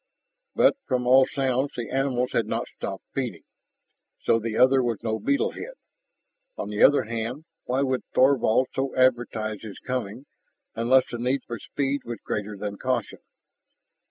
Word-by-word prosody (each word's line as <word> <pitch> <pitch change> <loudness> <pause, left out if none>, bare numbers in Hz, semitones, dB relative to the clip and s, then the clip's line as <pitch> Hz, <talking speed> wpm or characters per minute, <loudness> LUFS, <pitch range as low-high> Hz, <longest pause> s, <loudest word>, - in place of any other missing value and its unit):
But - - +4
from 125 -2 0
all 130 +1 +6
sounds 135 0 0
the 120 -2 -4
animals 130 -2 0
had 115 - 0
not - - -2
stopped - - -5
feeding. - - -3 0.8
So 115 - +3
the 115 0 -3
other 130 +1 +5
was 120 -4 -2
no 110 -1 -1
beetle 280 - +1
head. - - -8 0.8
On - - -4
the 105 0 -3
other 145 - +6
hand, 115 +6 -4 0.2
why 130 +2 +1
would 130 -2 0
Thorvald 130 -2 +4
so 135 0 -2
advertise 120 -4 +1
his 110 -3 -9
coming, 125 0 -4 0.5
unless 125 +3 +4
the 120 - -4
need 125 +2 0
for 120 -2 -6
speed 140 +5 -2
was 120 -1 -5
greater 105 0 -3
than 100 0 -5
caution? 130 -1 -2
125 Hz, 155 wpm, -25 LUFS, 115-135 Hz, 0.8 s, all